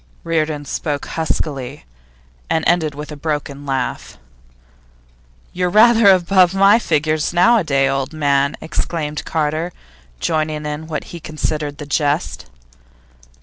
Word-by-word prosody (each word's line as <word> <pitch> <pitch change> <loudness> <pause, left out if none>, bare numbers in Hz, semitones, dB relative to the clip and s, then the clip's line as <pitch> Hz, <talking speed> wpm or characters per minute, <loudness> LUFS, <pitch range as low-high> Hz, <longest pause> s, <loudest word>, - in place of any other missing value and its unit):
Reardon 155 -3 -1
spoke 145 0 -3
huskily, 145 -4 -3 0.6
and 160 - 0
ended 160 -4 +1
with 150 +1 -7
a - - -6
broken 145 -2 -4
laugh. 135 -2 -3 1.4
'You're 180 0 0
rather 220 +1 +6
above 185 0 +4
my 200 +3 +6
figure 155 -5 0
nowadays, 175 - +3
old 135 0 -2
man!' 140 -2 +1
exclaimed 150 -1 -3
Carter, 160 +2 -1 0.5
joining 155 - -1
in 150 +1 -5
what 155 -2 -4
he 170 - -6
considered 150 -2 -3
the 150 - -7
jest. 145 +3 -1
155 Hz, 115 wpm, -19 LUFS, 145-170 Hz, 1.4 s, rather